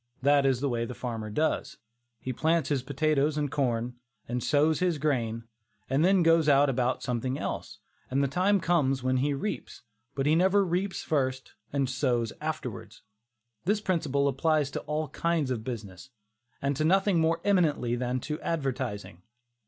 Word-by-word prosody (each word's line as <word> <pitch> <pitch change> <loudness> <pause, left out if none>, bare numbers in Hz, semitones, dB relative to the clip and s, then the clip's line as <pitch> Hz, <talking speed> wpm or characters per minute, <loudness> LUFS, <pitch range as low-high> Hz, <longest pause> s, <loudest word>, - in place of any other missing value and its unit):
That 140 0 +4
is 130 -2 +1
the 140 - +1
way 120 -2 -1
the 125 - -7
farmer 115 -4 -4
does; 155 +9 -1 0.4
he 130 - -4
plants 160 +3 +1
his 140 -3 +1
potatoes 145 +2 +1
and 145 -2 -1
corn, 125 -3 -1 0.3
and 120 +1 -2
sows 150 +2 +2
his 180 -3 +1
grain, 120 -6 -1 0.5
and 140 +4 +3
then 185 0 +4
goes 165 -1 +4
about 135 -3 +3
something 125 +1 -2
else, - - -5 0.3
and 135 +2 +1
the - - +2
time 185 +8 +2
comes 140 -7 +1
when 130 0 +1
he 140 +2 +1
reaps. 150 - -5 0.3
But 135 - -1
he 150 - +4
never 190 +4 +4
reaps 185 +2 -2
first 130 -3 -1 0.2
and 140 -2 0
sows 125 -3 0
afterwards. - - -5 0.6
This 205 +3 +2
principle 150 -8 0
applies 145 +1 +1
to - - -3
all 150 0 -2
kinds 160 -3 0
of 115 -3 -2
business, 110 -3 -7 0.5
and 140 0 +1
to 155 - 0
nothing 190 +2 +3
more 165 +1 +2
eminently 160 -11 +2
than 125 +1 -1
to 150 +4 -4
advertising. 130 - -3
140 Hz, 165 wpm, -28 LUFS, 130-160 Hz, 0.6 s, That